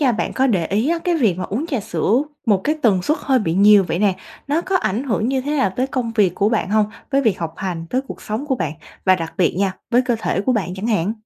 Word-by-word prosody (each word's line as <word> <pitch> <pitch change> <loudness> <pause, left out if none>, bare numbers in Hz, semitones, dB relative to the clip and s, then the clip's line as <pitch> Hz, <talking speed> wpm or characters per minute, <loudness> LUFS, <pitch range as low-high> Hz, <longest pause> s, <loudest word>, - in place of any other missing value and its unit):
nha, 260 -5 +3
bạn 215 - -2
có 265 - +2
để 190 -10 +1
ý 215 - 0
á, 340 +1 +1
cái 345 +1 0
việc 225 - +2
mà 185 - -3
uống 250 +11 -3
trà 275 -9 -2
sữa 230 +5 +1 0.2
một 205 -4 +3
cái 305 - +2
tần 195 -6 +3
suất 305 - 0
hơi 265 -2 +2
bị 170 -8 -1
nhiều 200 +1 +6
vậy 175 - -2
nè, 195 -2 +2 0.3
nó 300 +3 +1
có 375 +2 0
ảnh 220 - -1
hưởng 230 -3 0
như 265 0 0
thế 290 +3 -2
nào 260 -8 +2
tới 255 - +1
công 250 -4 -3
việc 195 -5 +3
của 200 - +2
bạn 220 -3 -1
hông? 215 0 +3 0.2
Với 275 -1 +3
việc 225 -7 +1
học 165 -1 -4
hành, 175 -4 -4
tới 255 - +1
cuộc - - -8
sống 220 +7 -4
của 270 - +1
bạn 155 - -2 0.3
và 185 - +5
đặc 165 -3 -5
biệt 180 - +2
nha, 195 -1 +1 0.2
với 245 +1 +4
cơ 245 -2 0
thể 205 - -1
của 255 +6 +1
bạn 185 -6 -2
chẳng 195 +3 -4
hạn. 210 -3 +1
220 Hz, 290 wpm, -20 LUFS, 190-265 Hz, 0.3 s, nhiều